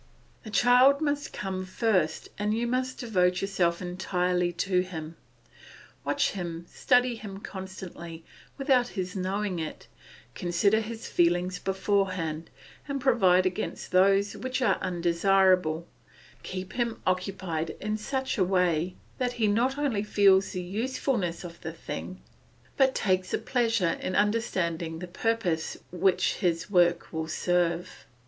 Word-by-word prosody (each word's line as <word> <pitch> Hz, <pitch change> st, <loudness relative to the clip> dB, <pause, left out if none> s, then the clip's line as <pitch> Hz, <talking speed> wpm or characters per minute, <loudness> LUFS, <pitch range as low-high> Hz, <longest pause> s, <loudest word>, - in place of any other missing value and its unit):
The 220 Hz, -, -10 dB
child 250 Hz, +6 st, +5 dB
must 290 Hz, -1 st, -1 dB
come 190 Hz, -1 st, -4 dB
first, 185 Hz, -4 st, 0 dB
and 210 Hz, +1 st, 0 dB
you 235 Hz, -, 0 dB
must 255 Hz, +1 st, -1 dB
devote 180 Hz, -6 st, +1 dB
yourself 180 Hz, -3 st, 0 dB
entirely 180 Hz, -1 st, 0 dB
to 180 Hz, +1 st, +1 dB
him. 165 Hz, -3 st, -5 dB, 0.9 s
Watch -, -, +1 dB
him, 170 Hz, -3 st, -5 dB
study 250 Hz, -1 st, +3 dB
him 210 Hz, -4 st, -8 dB
constantly, 185 Hz, -4 st, -8 dB, 0.3 s
without 265 Hz, -3 st, +3 dB
his 185 Hz, -4 st, -5 dB
knowing 190 Hz, 0 st, -2 dB
it; 160 Hz, -1 st, -6 dB, 0.5 s
consider 190 Hz, +5 st, +2 dB
his 225 Hz, +1 st, -6 dB
feelings 175 Hz, +1 st, +1 dB
beforehand, 190 Hz, -5 st, -1 dB, 0.4 s
and 280 Hz, -1 st, -2 dB
provide 190 Hz, -9 st, +4 dB
against 185 Hz, -1 st, -3 dB
those 195 Hz, +2 st, +4 dB
which 260 Hz, 0 st, -3 dB
are 255 Hz, -, +2 dB
undesirable, 180 Hz, -1 st, +2 dB, 0.6 s
keep 185 Hz, 0 st, -6 dB
him 235 Hz, -2 st, -1 dB
occupied 185 Hz, -3 st, -2 dB
in 215 Hz, +1 st, -2 dB
such 260 Hz, +3 st, -2 dB
a -, -, +5 dB
way 180 Hz, -2 st, +1 dB, 0.2 s
that 250 Hz, -1 st, 0 dB
he 230 Hz, -3 st, +1 dB
not 240 Hz, +6 st, +1 dB
only 275 Hz, -8 st, 0 dB
feels 200 Hz, -2 st, +4 dB
the 180 Hz, -1 st, -3 dB
usefulness 210 Hz, -2 st, -2 dB
of 170 Hz, -1 st, -10 dB
the 160 Hz, -1 st, -5 dB
thing, 185 Hz, +3 st, -7 dB, 0.6 s
but 265 Hz, -1 st, +3 dB
takes 185 Hz, -2 st, +1 dB
a -, -, +1 dB
pleasure 225 Hz, -9 st, 0 dB
in 185 Hz, -, -2 dB
understanding 175 Hz, -7 st, 0 dB
the 180 Hz, -, -6 dB
purpose 185 Hz, -4 st, -1 dB
which 180 Hz, +1 st, +2 dB
his 175 Hz, 0 st, -1 dB
work 175 Hz, -3 st, +3 dB
will 160 Hz, 0 st, -2 dB
serve. 175 Hz, +1 st, -1 dB
190 Hz, 135 wpm, -28 LUFS, 175-220 Hz, 0.9 s, child